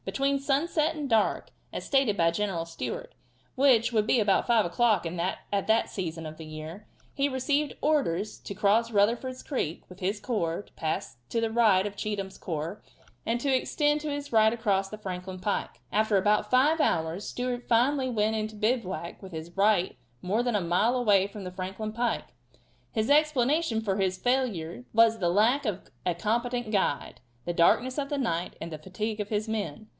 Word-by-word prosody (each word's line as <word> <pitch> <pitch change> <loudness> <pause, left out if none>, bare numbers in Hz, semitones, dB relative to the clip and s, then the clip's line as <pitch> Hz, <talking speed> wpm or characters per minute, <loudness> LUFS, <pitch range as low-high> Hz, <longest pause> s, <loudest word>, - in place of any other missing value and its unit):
Between 275 0 0
sunset 305 +3 +1
and 295 -2 -3
dark, 225 -4 +1 0.2
as - - -5
stated 270 -7 +2
by 165 0 +3
General 175 -2 -2
Stewart, - - -5 0.4
which 255 -4 +4
would 215 -1 +2
be 245 - +4
about 205 -3 +2
5 230 -3 +4
o'clock 215 +4 +2
at 180 +3 -2
that 220 +1 +3
season 165 -4 -4
of 155 0 -7
the 160 - -9
year, 155 +6 -8 0.3
he 280 +1 +1
received 285 +3 0
orders 215 - 0
to 200 - -7
cross 215 +4 +3
Rutherford's 235 +5 +1
creek 170 - -3
with 180 +1 -13
his 195 +2 -1
corps, 205 -5 -2
to - - -25
pass 155 -6 -3
to 230 - 0
the 225 -1 0
right 215 -5 +4
of 205 -1 -4
Cheatham's 200 -2 -4
corps, 165 +3 -4 0.5
and 230 +2 +1
to 275 -1 +2
extend 295 +3 +1
his 290 -3 -4
right 220 0 +6
across 200 -4 0
the 215 - -7
Franklin 185 -2 -6
pike. 205 +3 -2
After 215 -1 +2
about 210 +2 +2
five 295 +6 +4
hours 165 - 0
Stewart 245 -1 -3
finally 260 +3 +2
went 220 -2 +1
into 215 0 -3
bivouac 210 -6 -2
with 190 -1 -10
his 160 +2 -7
right 195 - +2 0.3
more 205 +6 +1
than 245 -2 0
a 205 - +2
mile 180 +8 +2
away 205 -5 +4
from 200 0 -9
the 180 - -6
Franklin 190 +4 -5
pike. 240 +1 -2 0.6
His 220 +3 0
explanations 290 -4 +2
for 195 -1 0
his 190 -1 0
failure 245 -5 -1
were 225 0 +6
the 180 -6 0
lack 225 +10 +3
of 200 -3 -4 0.2
a 175 - +1
competent 235 +4 -1
guide, 190 - -1 0.2
the 175 - -1
darkness 245 - +3
of 280 -1 -3
the 290 - -1
night, 175 -10 -1
and 170 - -6
the 155 - -6
fatigue 210 +6 -4
of 205 0 -3
his 215 0 -1
men. 215 0 -4
215 Hz, 185 wpm, -28 LUFS, 190-245 Hz, 0.6 s, right